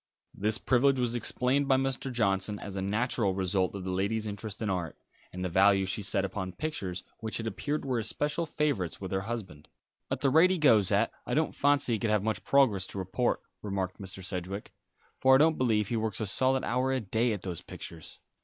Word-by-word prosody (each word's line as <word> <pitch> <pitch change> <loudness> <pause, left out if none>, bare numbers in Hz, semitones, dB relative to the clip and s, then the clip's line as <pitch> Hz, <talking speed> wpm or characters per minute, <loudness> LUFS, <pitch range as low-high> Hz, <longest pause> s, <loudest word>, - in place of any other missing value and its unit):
This 105 +2 +2
privilege 130 +2 +3
was 120 -1 0
explained 125 +3 +1
by 135 - +5
Mr. 135 0 -1
Johnson 105 -3 +1
as 100 -1 -7
a 95 - -2
natural 105 0 0
result 95 0 0
of 100 - -5
the 95 - -3
lady's 100 +4 -1
interest 105 0 -5
in 110 - -2
art, 90 -5 -2 0.3
and 90 +1 -4
the - - +1
value 95 +2 +4
she 95 +3 -2
set 100 -1 +1
upon 95 -1 -4
pictures 95 - -4 0.2
which 110 0 -3
it 115 - -4
appeared 145 +8 -3
were 130 -3 0
especial 150 +8 -1
favourites 145 - -1
with 95 -2 -6
her 95 0 0
husband. 95 -9 -6 0.4
"At - - -2
the 135 - +3
rate 160 +6 +6
he 185 - +1
goes 115 - +4
at - - +3
it, - - -31
I - - -1
don't - - +1
fancy 145 -3 +2
he 110 - 0
can 115 - -1
have 105 -2 +2
much 110 -4 -2
progress 110 -9 +3
to - - -8
report," 95 +6 -1 0.2
remarked 95 -2 -3
Mr. 95 0 -7
Sedgewick, 95 +2 -5 0.5
"for 130 0 +5
I - - +8
don't 155 +2 +3
believe 110 -5 +2
he 120 - 0
works 110 -2 -2
a 110 - -1
solid 130 +6 +2
hour 125 +2 0
a 130 - +1
day 115 +2 0
at 105 -4 -4
those 90 -4 -5
pictures. 80 -1 -10
105 Hz, 220 wpm, -29 LUFS, 95-130 Hz, 0.5 s, I